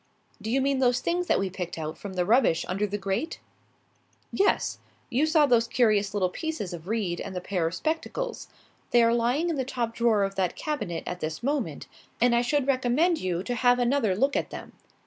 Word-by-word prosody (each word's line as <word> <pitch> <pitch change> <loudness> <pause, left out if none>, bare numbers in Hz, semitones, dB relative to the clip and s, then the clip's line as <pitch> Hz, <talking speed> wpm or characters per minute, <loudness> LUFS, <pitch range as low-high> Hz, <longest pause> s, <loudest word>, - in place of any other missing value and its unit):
"Do 215 - -4
you 265 +4 +2
mean 275 0 +1
those 250 -1 +3
things 350 +4 -1
that - - +3
we 195 -1 -1
picked 180 -2 -5
out 155 -1 -4
from 200 -2 -8
the 180 -1 0
rubbish 225 -6 +3
under 195 +3 -1
the 205 +1 -3
grate?" 200 +11 -3 0.9
"Yes. 400 +1 +1 0.3
You 275 +6 +2
saw 310 -2 +5
those 235 -4 +3
curious 210 -4 +2
little 185 -3 +1
pieces 310 - -4
of 170 0 -8
reed 200 -6 -1
and 190 - -6
the - - -1
pair 180 -2 -1
of 165 - -4
spectacles. 330 - -3 0.4
They 240 -1 +5
are 230 0 +4
lying 250 +9 +1
in 315 - -2
the 265 - 0
top 245 -3 -3
drawer 230 -3 +2
of 195 0 -1
that 185 -3 -1
cabinet 210 - -3
at 180 - -5
this 155 +2 -4
moment, 255 - -2 0.3
and 245 +1 +4
I 235 - +4
should 280 +2 +1
recommend 275 +6 +2
you 180 -1 -2
to 245 - -3
have 245 +1 +3
another 245 -5 +2
look 270 +7 +1
at - - -1
them. - - -9
235 Hz, 210 wpm, -27 LUFS, 190-275 Hz, 0.9 s, saw